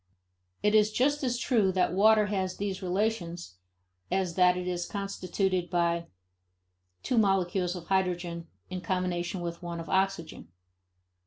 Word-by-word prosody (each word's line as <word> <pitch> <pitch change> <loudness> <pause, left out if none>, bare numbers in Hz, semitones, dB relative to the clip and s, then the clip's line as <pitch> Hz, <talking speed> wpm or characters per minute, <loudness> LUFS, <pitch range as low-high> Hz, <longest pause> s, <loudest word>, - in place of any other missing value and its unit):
It 210 0 +3
is 215 0 +5
just 285 +6 +1
as 245 -2 0
true 225 -7 +2
that 180 -2 +1
water 215 +2 +5
has 190 -3 -2
these 195 -2 -3
relations 180 - -2 0.5
as 185 -1 0
that 180 0 +4
it 180 0 -4
is 175 -1 -2
constituted 190 -2 -2
by 170 -1 0 1.0
two 245 - +2
molecules 190 -3 +1
of 175 -2 -7
hydrogen 175 -3 -1 0.2
in 185 -1 -4
combination 180 -1 -2
with 170 0 -5
one 170 -1 -5
of 165 - -7
oxygen. 190 - -1
185 Hz, 140 wpm, -29 LUFS, 175-200 Hz, 1.0 s, is